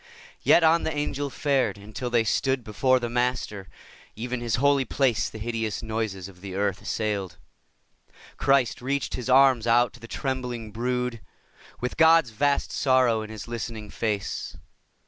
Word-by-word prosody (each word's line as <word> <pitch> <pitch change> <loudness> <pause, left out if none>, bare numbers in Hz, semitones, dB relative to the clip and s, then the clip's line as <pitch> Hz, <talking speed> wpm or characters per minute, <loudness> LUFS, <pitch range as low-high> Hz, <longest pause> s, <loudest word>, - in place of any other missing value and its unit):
Yet 170 - +5
on 165 +1 +5
the - - -2
Angel 145 -1 -2
fared, 130 -8 0
until 110 +5 -6
they 120 -1 +3
stood 130 +3 0
Before 130 +5 +2
the 120 - -3
Master. 120 -5 -2 0.5
(Even 120 +2 -4
His 120 -2 0
holy 140 +2 +3
place 125 -4 +1
The - - -9
hideous 115 0 -3
noises 110 -4 -3
of 90 -2 -16
the 95 -1 -7
earth 100 -1 -1
assailed.) 100 -4 -3 1.0
Christ 135 -4 +2
reached 140 +2 -2
His 125 0 -4
arms 130 -3 +5
out 120 +1 +4
to 125 - -14
the 115 - -11
trembling 125 -4 -4
brood, 125 +1 -2 0.6
With 125 - -3
God's 160 -5 +5
vast 140 +5 0
sorrow 130 -4 +3
in 110 - -7
His 110 0 -8
listening 115 -3 -6
face. 105 -3 -3
120 Hz, 155 wpm, -26 LUFS, 110-130 Hz, 1.0 s, Yet